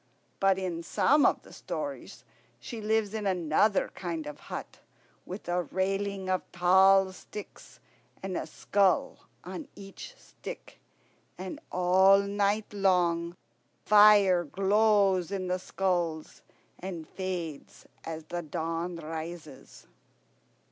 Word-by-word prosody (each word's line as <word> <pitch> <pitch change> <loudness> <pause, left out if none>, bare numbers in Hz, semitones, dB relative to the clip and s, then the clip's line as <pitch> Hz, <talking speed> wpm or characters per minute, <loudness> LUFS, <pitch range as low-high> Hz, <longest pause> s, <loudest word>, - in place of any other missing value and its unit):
But 195 -1 +3
in 180 -3 -3
some 290 - +3
of - - 0
the - - -15
stories - - -6 0.4
she 230 -3 -7
lives 215 -1 0
in 215 -2 -2
another 185 +3 +2
kind 165 -4 -4
of 150 0 -8
hut, - - -7 0.5
with 185 +1 -8
a 175 +1 +1
railing 195 +2 -2
of 185 -1 +1
tall 190 +2 +5
sticks, 205 +2 -11 0.4
and 190 -1 -3
a - - -3
skull 195 -2 0 0.2
on 310 - -7
each 200 - -10
stick. - - -11 0.6
And 185 0 -6
all 185 +2 +5
night 200 +1 0
long 175 -3 +1 0.5
fire 205 -4 +6
glows 195 +1 +2
in 195 -2 -2
the 180 0 0
skulls 175 -5 -2 0.4
and 175 -4 -6
fades 175 -6 -6 0.2
as 160 -1 -6
the 175 +2 -5
dawn 165 +2 -3
rises." 160 -2 -8
185 Hz, 115 wpm, -29 LUFS, 170-200 Hz, 0.6 s, fire